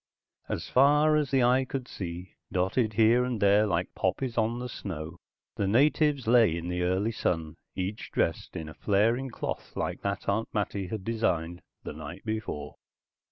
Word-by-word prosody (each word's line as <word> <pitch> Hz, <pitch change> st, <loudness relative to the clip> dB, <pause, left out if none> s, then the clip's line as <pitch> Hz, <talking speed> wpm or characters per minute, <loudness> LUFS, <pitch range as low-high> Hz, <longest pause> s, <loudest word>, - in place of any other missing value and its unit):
As -, -, -3 dB
far 150 Hz, +4 st, +5 dB
as 150 Hz, -3 st, +1 dB
the 135 Hz, -2 st, +3 dB
eye 125 Hz, +2 st, +4 dB
could 130 Hz, -1 st, -5 dB
see, 90 Hz, -3 st, -7 dB, 0.2 s
dotted 100 Hz, +5 st, +1 dB
here 115 Hz, +3 st, +4 dB
and 125 Hz, -3 st, -2 dB
there 100 Hz, +2 st, +4 dB
like 90 Hz, -1 st, -1 dB
poppies 115 Hz, +6 st, -1 dB
on 120 Hz, +2 st, 0 dB
snow, 80 Hz, -7 st, -6 dB, 0.4 s
the 100 Hz, -, 0 dB
natives 140 Hz, +4 st, +3 dB
lay 115 Hz, -7 st, +5 dB
in 85 Hz, +1 st, -5 dB
the 90 Hz, 0 st, -2 dB
early 95 Hz, +5 st, +1 dB
sun, 80 Hz, -7 st, -1 dB, 0.2 s
each 95 Hz, +3 st, -4 dB
dressed 80 Hz, -, -1 dB
in 80 Hz, -1 st, -6 dB
flaring 115 Hz, +9 st, +1 dB
cloth -, -, -5 dB
like -, -, -2 dB
that 100 Hz, 0 st, -3 dB
Aunt 110 Hz, +3 st, 0 dB
Mattie 100 Hz, -2 st, -1 dB
had 100 Hz, +1 st, -5 dB
designed 85 Hz, -6 st, -1 dB, 0.2 s
the -, -, -6 dB
night 80 Hz, +6 st, -9 dB
before. 110 Hz, -10 st, -4 dB
105 Hz, 160 wpm, -28 LUFS, 90-125 Hz, 0.4 s, far